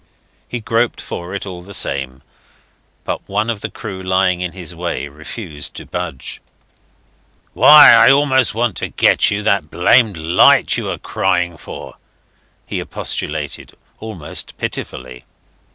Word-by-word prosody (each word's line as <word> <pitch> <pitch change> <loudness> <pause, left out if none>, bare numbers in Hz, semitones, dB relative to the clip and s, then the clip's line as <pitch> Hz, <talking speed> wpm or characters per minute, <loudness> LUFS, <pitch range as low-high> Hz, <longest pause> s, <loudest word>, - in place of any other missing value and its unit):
He 120 - -5
groped 115 +1 0
for 90 +3 -7
it 100 - -5
all 90 -3 -8
the 100 +2 -8
same, 65 -1 -1 0.8
but - - -5
one 105 +4 0
of 105 -3 -6
the - - -4
crew 95 -5 -8
lying 95 -1 +1
in 90 -1 -3
his 90 -2 -7
way 85 -3 -4
refused 75 - -7
to - - -8
budge. 65 - -6 1.1
"Why, 150 0 +9
I 115 +1 +7
only 135 -1 +4
want 115 -4 -1
to - - -2
get - - +3
you 105 +1 -2
that 100 -7 +1
blamed 105 +3 +3
light 80 +2 +4
you - - -3
are - - -3
crying 90 -2 -1
for," - - -10 0.7
he - - -4
expostulated, 75 -1 -4 0.3
almost 105 -9 -7
pitifully. 60 -1 -5
95 Hz, 140 wpm, -17 LUFS, 80-110 Hz, 1.1 s, Why